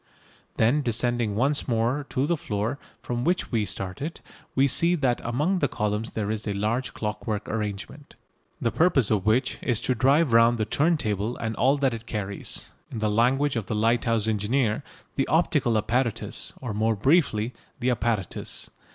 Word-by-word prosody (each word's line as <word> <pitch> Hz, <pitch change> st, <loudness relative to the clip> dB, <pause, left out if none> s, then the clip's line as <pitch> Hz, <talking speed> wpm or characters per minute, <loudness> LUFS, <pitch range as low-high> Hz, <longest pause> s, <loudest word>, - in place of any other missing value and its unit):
Then 120 Hz, +7 st, +3 dB
descending 120 Hz, -3 st, 0 dB
once 140 Hz, +6 st, +1 dB
more 120 Hz, +4 st, 0 dB
to 130 Hz, +1 st, 0 dB
the 170 Hz, +3 st, +1 dB
floor 115 Hz, -1 st, -3 dB, 0.2 s
from 120 Hz, 0 st, -2 dB
which 180 Hz, +5 st, 0 dB
we 110 Hz, -4 st, +1 dB
started, 95 Hz, -, -4 dB, 0.4 s
we 135 Hz, +1 st, +4 dB
see 170 Hz, +6 st, +3 dB
that 130 Hz, -7 st, 0 dB
among 150 Hz, +11 st, 0 dB
the 145 Hz, -, +2 dB
columns 105 Hz, 0 st, -2 dB
there 105 Hz, -1 st, -2 dB
is 110 Hz, 0 st, -4 dB
a 105 Hz, -, 0 dB
large 115 Hz, +6 st, -1 dB
clockwork 105 Hz, 0 st, -3 dB
arrangement, 105 Hz, +6 st, -5 dB, 0.4 s
the 115 Hz, -, 0 dB
purpose 155 Hz, -, +3 dB
of 105 Hz, -2 st, +1 dB
which 115 Hz, +5 st, +2 dB
is 120 Hz, -5 st, +1 dB
to 130 Hz, -, +1 dB
drive 135 Hz, +3 st, +3 dB
round 115 Hz, +1 st, +5 dB
the 110 Hz, -, 0 dB
turntable 115 Hz, -, 0 dB
and 115 Hz, -1 st, -3 dB
all 135 Hz, +4 st, +3 dB
that 135 Hz, -3 st, +1 dB
it 115 Hz, 0 st, -7 dB
carries 100 Hz, -3 st, -3 dB, 0.2 s
in -, -, -6 dB
the 110 Hz, -1 st, 0 dB
language 130 Hz, +6 st, +2 dB
of 110 Hz, -5 st, -2 dB
the 110 Hz, -, -2 dB
lighthouse 115 Hz, 0 st, +1 dB
engineer 110 Hz, +3 st, +1 dB, 0.4 s
the 135 Hz, -, +1 dB
"optical 150 Hz, -8 st, +2 dB
apparatus" 115 Hz, +1 st, -1 dB
or, 125 Hz, -5 st, -4 dB
more 110 Hz, +2 st, +1 dB
briefly, 125 Hz, -, +2 dB, 0.3 s
"the 125 Hz, +1 st, +1 dB
apparatus." 110 Hz, -5 st, -2 dB
115 Hz, 170 wpm, -26 LUFS, 110-135 Hz, 0.4 s, round